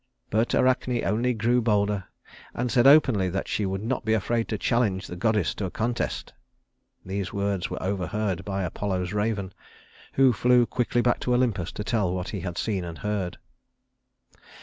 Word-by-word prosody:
But 110 +3 +1
Arachne 125 -1 +2
only 115 +5 +1
grew 120 +3 +2
bolder, 105 -3 +1 0.5
and 125 0 -1
said 125 0 +5
openly 130 -10 +5
that 95 +2 -3
she 105 - -1
would 95 +1 -3
not 125 +2 -2
be 110 0 +1
afraid 115 +2 0
to 110 - -2
challenge 105 -4 +1
the 90 - -7
goddess 105 -1 +1
to 100 - -4
a - - -2
contest. 120 +5 -2 0.7
These 95 0 -3
words 100 -2 -1
were - - -5
overheard 95 0 -2
by 95 0 -2
Apollo's 90 +1 -2
raven, 105 -2 -1 0.6
who 135 -2 +5
flew 125 +3 +4
quickly 120 0 0
back 120 - +2
to 125 - +1
Olympus 115 -9 0
to 105 - -4
tell 100 -3 0
what 90 +1 -4
he 100 - -4
had 90 -2 -5
seen 100 -5 -1
and 85 -1 -7
heard. 100 -4 -3
105 Hz, 170 wpm, -26 LUFS, 95-120 Hz, 0.7 s, said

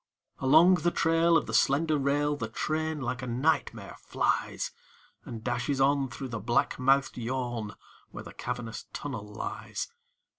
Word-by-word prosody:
Along 160 +7 +6
the 170 +1 +1
trail 165 0 +3
Of - - -1
the - - -6
slender 155 +3 +3
rail 145 +1 +1
The 115 -5 -4
train, 155 +5 -2
like 125 0 -3
a 125 - -5
nightmare, 130 +7 -1
flies - - -1 0.5
And 115 -2 -7
dashes 120 +4 -1
on 135 0 +3
Through 130 +1 -6
the 115 -2 -4
black 120 +4 0
mouthed 135 +1 +2
yawn 120 -3 -3 0.3
Where - - -8
the - - -11
cavernous 120 -2 -5
tunnel 110 -8 -5
lies. 470 - -5
135 Hz, 150 wpm, -29 LUFS, 120-155 Hz, 0.5 s, Along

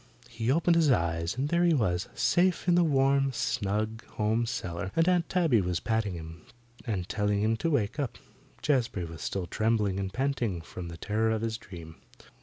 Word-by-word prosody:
He 115 +1 -1
opened 170 +3 +3
his 165 -3 +4
eyes 85 -3 0
and 140 +3 -1
there 170 +1 +2
he 170 -2 +4
was, 90 -8 0
safe 175 +11 +2
in 175 - +5
the 175 0 +5
warm, 135 -2 +3
snug 110 0 -1
home 110 +2 +1
cellar, 95 -6 -4
and 165 +1 +3
Aunt 180 -2 +2
Tabby 165 - +3
was 90 -2 -1
patting 110 -5 -1
him, 80 0 -9 0.5
and 95 -6 -2
telling 105 -1 0
him 110 +1 +2
to 165 - -1
wake 140 -2 0
up. 140 -5 -2 0.5
Jazbury 120 - +1
was 80 -1 -9
still 95 -2 -2
trembling 105 -1 0
and 95 -1 -3
panting 125 -7 -1
from 85 +1 -8
the 85 -1 -8
terror 110 +5 0
of 110 0 -1
his 110 -1 -2
dream. 85 -7 -11
110 Hz, 190 wpm, -29 LUFS, 95-135 Hz, 0.5 s, in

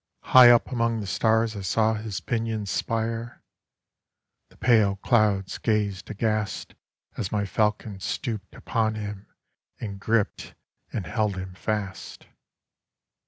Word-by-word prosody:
High 125 -1 +8
up 120 +2 +5
among 115 -2 0
the 105 - -4
stars 110 +2 +1
I 100 - -5
saw 110 +4 +2
his 110 -3 -4
pinions 110 -4 -2
spire. 115 +1 -2 1.1
The - - -22
pale 110 -5 +4
clouds 100 -2 +1
gazed 105 -4 0
aghastAs 110 -2 -4
my 105 -1 0
falcon 105 0 -1
stooped 110 -1 -4
upon 110 -2 -1
him, 105 -2 -6 0.5
and 100 -3 -6
gript 110 +1 -1 0.4
and - - -3
held 105 -3 0
him 95 0 -6
fast. 100 0 -4
110 Hz, 120 wpm, -26 LUFS, 100-115 Hz, 1.1 s, High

